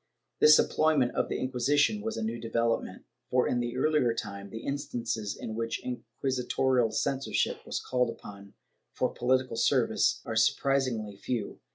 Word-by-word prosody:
This 150 0 +8
employment 155 -6 +2
of - - 0
the - - -1
Inquisition 145 - +1
was 225 +1 -3
a 225 - -2
new 220 +1 -3
development, 115 0 -1 0.3
for 125 0 +2
in 120 - 0
the 120 +1 -3
earlier 135 -4 +2
time, 100 -3 -6
the 110 +2 -8
instances 120 -6 -3
in 110 - -5
which 115 +1 -2
inquisitorial 125 0 0
censorship 135 +5 -1
was - - -2
called 125 -1 0
upon 100 -3 -10 0.4
for - - 0
political 130 -1 +1
service - - +2
are - - -4
surprisingly 125 -7 +1
few. 115 0 -4
125 Hz, 150 wpm, -29 LUFS, 115-135 Hz, 0.4 s, This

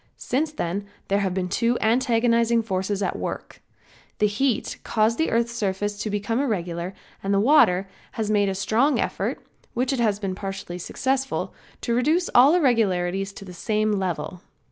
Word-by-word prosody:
Since 295 +5 -1
then 200 - -3 0.2
there 200 +1 +2
have 190 -2 -1
been 185 -1 -1
two 235 +6 +1
antagonizing 230 0 +2
forces 195 0 -1
at - - -2
work. - - -6 0.6
The 210 - +3
heat 220 +3 +1
has - - -5
caused 225 +1 +1
the 320 - +2
earth's 235 +1 +1
surface 205 -2 -2
to 215 - -2
become 205 +3 -1
irregular 180 -7 -2 0.3
and 195 - -2
the 200 - +3
water 200 -7 +4 0.3
has 215 -2 -2
made 205 -2 +3
a 190 - -2
strong 230 +9 +2
effort, - - -2 0.3
which 250 +2 +1
has 230 -6 +1
been 195 -2 -3
partially 195 -2 -6
successful, 265 +8 -2 0.3
to 235 - -1
reduce 310 +9 +2
all 270 +7 +7
irregularities 195 - +1
to 195 - -10
the 180 - -10
same 215 +3 0
level. 180 -3 -2
210 Hz, 165 wpm, -24 LUFS, 195-240 Hz, 0.6 s, all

